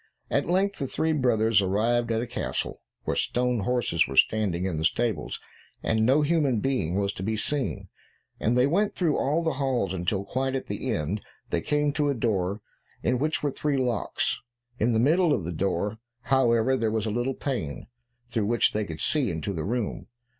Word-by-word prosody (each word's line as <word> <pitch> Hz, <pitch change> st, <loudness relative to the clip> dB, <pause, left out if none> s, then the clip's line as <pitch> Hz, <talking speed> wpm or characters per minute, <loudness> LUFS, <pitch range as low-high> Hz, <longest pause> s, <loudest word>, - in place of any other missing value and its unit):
At -, -, +1 dB
length 195 Hz, +2 st, +1 dB
the 135 Hz, -, -1 dB
three 160 Hz, +4 st, 0 dB
brothers 115 Hz, -6 st, +3 dB
arrived 115 Hz, +5 st, +1 dB
at 115 Hz, +1 st, +1 dB
a -, -, -3 dB
castle -, -, -3 dB, 0.2 s
where -, -, -1 dB
stone 125 Hz, -1 st, +1 dB
horses 115 Hz, -7 st, +1 dB
were 70 Hz, -, -6 dB
standing 95 Hz, +1 st, +3 dB
in 90 Hz, -5 st, -1 dB
the 80 Hz, -, -2 dB
stables, 110 Hz, 0 st, 0 dB, 0.4 s
and 110 Hz, -1 st, +2 dB
no 140 Hz, +4 st, +4 dB
human 145 Hz, -6 st, +2 dB
being 125 Hz, -10 st, 0 dB
was 100 Hz, 0 st, 0 dB
to -, -, -7 dB
be 110 Hz, +3 st, -1 dB
seen, 110 Hz, -6 st, -2 dB, 0.5 s
and 120 Hz, +3 st, +1 dB
they 125 Hz, -, +5 dB
went 200 Hz, +9 st, +1 dB
through 165 Hz, -5 st, +1 dB
all 150 Hz, +5 st, +1 dB
the 160 Hz, -, +1 dB
halls 125 Hz, -9 st, 0 dB
until, 95 Hz, +2 st, -1 dB
quite 130 Hz, +5 st, -1 dB
at 130 Hz, -, -2 dB
the 130 Hz, -, -3 dB
end, 100 Hz, +2 st, -1 dB, 0.3 s
they 85 Hz, -, +1 dB
came 150 Hz, -, +1 dB
to 150 Hz, -2 st, +1 dB
a 140 Hz, -, +1 dB
door 100 Hz, -3 st, 0 dB, 0.4 s
in 125 Hz, -, +1 dB
which 155 Hz, +3 st, 0 dB
were 145 Hz, -, +1 dB
three 145 Hz, +1 st, -1 dB
locks. 125 Hz, -3 st, 0 dB, 0.4 s
In 115 Hz, +2 st, +2 dB
the 110 Hz, -, +3 dB
middle 160 Hz, +6 st, +4 dB
of 100 Hz, -, -1 dB
the 85 Hz, -, -3 dB
door, 100 Hz, +5 st, -1 dB, 0.2 s
however, 125 Hz, -1 st, +3 dB
there 115 Hz, -4 st, 0 dB
was 110 Hz, 0 st, -1 dB
a 110 Hz, -, -1 dB
little 120 Hz, +4 st, -1 dB
pane, 110 Hz, -, -3 dB, 0.4 s
through 115 Hz, -4 st, -1 dB
which 120 Hz, +1 st, +3 dB
they 105 Hz, 0 st, 0 dB
could 80 Hz, -4 st, -7 dB
see 145 Hz, -6 st, +2 dB
into 85 Hz, +4 st, -3 dB
the 80 Hz, -4 st, -3 dB
room. 105 Hz, -5 st, -2 dB
115 Hz, 195 wpm, -27 LUFS, 100-135 Hz, 0.5 s, they